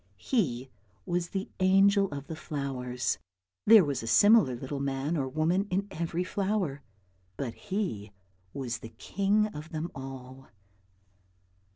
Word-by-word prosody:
He 135 - -1 0.3
was 175 0 -1
the 195 0 -3
angel 195 +1 +5
of 140 -1 -6
the 160 - -6
flowers. 135 -5 -3 0.5
There 215 -4 +9
was 140 -3 -2
a 115 - -6
similar 155 - +6
little 135 +3 -5
man 140 +3 -1
or 135 -4 0
woman 165 +7 +1
in 195 +2 0
every 170 +2 -2
flower, 190 -7 -1 0.6
but 125 -5 -3
he 175 - -3 0.4
was 120 -2 -4
the 115 - -9
king 200 +2 +1
of 150 +2 -8
them 160 +2 -4
all. 130 -1 -9
155 Hz, 135 wpm, -29 LUFS, 135-195 Hz, 0.6 s, There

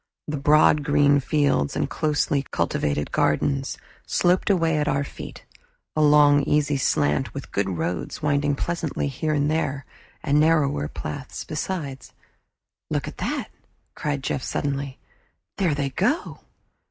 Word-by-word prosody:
The 150 - -2
broad 150 +1 +4
green 145 -1 +4
fields 140 - +1
and - - 0
closely 150 -2 0
cultivated 75 0 -1
gardens 135 - 0 0.3
sloped 180 +3 +2
away 165 -5 +2
at 150 - 0
our 140 0 +1
feet, - - -9 0.5
a 155 - +2
long 145 -1 +6
easy 150 0 +1
slant, 75 - +1
with - - -7
good 100 -1 0
roads 85 -1 -3
winding 145 -1 +1
pleasantly 170 -1 -2
here 155 +3 -1
and 145 +1 +1
there, 140 -3 -1 0.4
and 145 +1 +3
narrower 150 - +2
paths - - -6
besides. 140 -9 -5 0.8
"Look - - -1
at - - -8
that!" - - -2 0.4
cried 145 -2 -3
Jeff 135 - -1
suddenly. 140 0 -3 0.6
"There 175 -7 +2
they 140 -1 -2
go!" 220 - -1
145 Hz, 135 wpm, -24 LUFS, 135-155 Hz, 0.8 s, long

